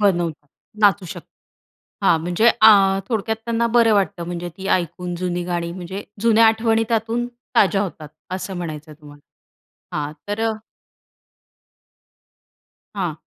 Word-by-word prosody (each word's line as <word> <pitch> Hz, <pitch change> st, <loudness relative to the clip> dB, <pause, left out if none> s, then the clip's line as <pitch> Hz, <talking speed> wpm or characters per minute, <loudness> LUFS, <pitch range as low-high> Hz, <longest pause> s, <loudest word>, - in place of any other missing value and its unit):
बनवतात. 170 Hz, -7 st, 0 dB, 0.3 s
नाचू 200 Hz, -2 st, +4 dB
शकतात. -, -, -9 dB, 0.8 s
हां, 165 Hz, -, +5 dB
म्हणजे 180 Hz, +8 st, +3 dB
आ, 195 Hz, -3 st, +6 dB
थोडक्यात 220 Hz, -1 st, -1 dB
त्यांना 235 Hz, 0 st, 0 dB
बरं 230 Hz, -2 st, +5 dB
वाटतं 195 Hz, -3 st, 0 dB
म्हणजे 175 Hz, 0 st, -5 dB
ती 195 Hz, 0 st, -7 dB
ऐकून 180 Hz, 0 st, -1 dB
जुनी 175 Hz, 0 st, -2 dB
गाणी 170 Hz, -1 st, -3 dB
म्हणजे 185 Hz, +2 st, -7 dB, 0.2 s
जुन्या 225 Hz, 0 st, +5 dB
आठवणी 225 Hz, 0 st, +2 dB
त्यातून 230 Hz, +1 st, 0 dB, 0.3 s
ताज्या 200 Hz, 0 st, +4 dB
होतात 160 Hz, -6 st, -6 dB, 0.3 s
असं 190 Hz, 0 st, -5 dB
म्हणायचंय 155 Hz, -3 st, -6 dB
तुम्हाला. 145 Hz, -1 st, -14 dB, 0.8 s
हां, 150 Hz, 0 st, -3 dB, 0.2 s
तर 205 Hz, +2 st, -2 dB
अ 220 Hz, -, -4 dB, 2.4 s
हां. 175 Hz, -5 st, -2 dB
190 Hz, 125 wpm, -21 LUFS, 170-220 Hz, 2.4 s, आ